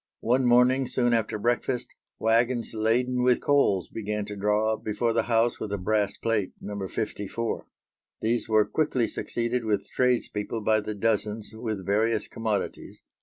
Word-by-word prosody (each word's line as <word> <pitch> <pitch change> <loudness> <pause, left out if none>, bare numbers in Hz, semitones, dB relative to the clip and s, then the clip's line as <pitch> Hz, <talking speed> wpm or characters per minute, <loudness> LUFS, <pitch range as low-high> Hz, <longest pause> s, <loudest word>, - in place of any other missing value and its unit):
One 125 +3 +2
morning, 125 +2 +4
soon 120 -1 +1
after 110 -2 0
breakfast, 120 +3 -1 0.2
waggons 115 +2 +1
laden 125 +3 +1
with 125 0 +4
coals 120 -11 +2
began 105 -1 -3
to 105 0 -6
draw 105 +2 +1
up - - -7
before 115 +2 0
the 115 - +3
house 115 +1 +2
with 110 - -4
the 100 - -2
brass 100 +1 0
plate, 110 -4 -1
No. 100 -2 -5
54. 105 +3 -3 0.5
These 115 +1 -1
were 110 -1 +4
quickly 130 -6 0
succeeded 120 +1 -2
with 105 -3 -1
tradespeople 115 -3 0
by 110 +1 +3
the 105 0 -4
dozen 105 0 0
with 110 -4 -4
various 110 +2 +1
commodities. 110 -2 -4
110 Hz, 155 wpm, -27 LUFS, 105-120 Hz, 0.5 s, morning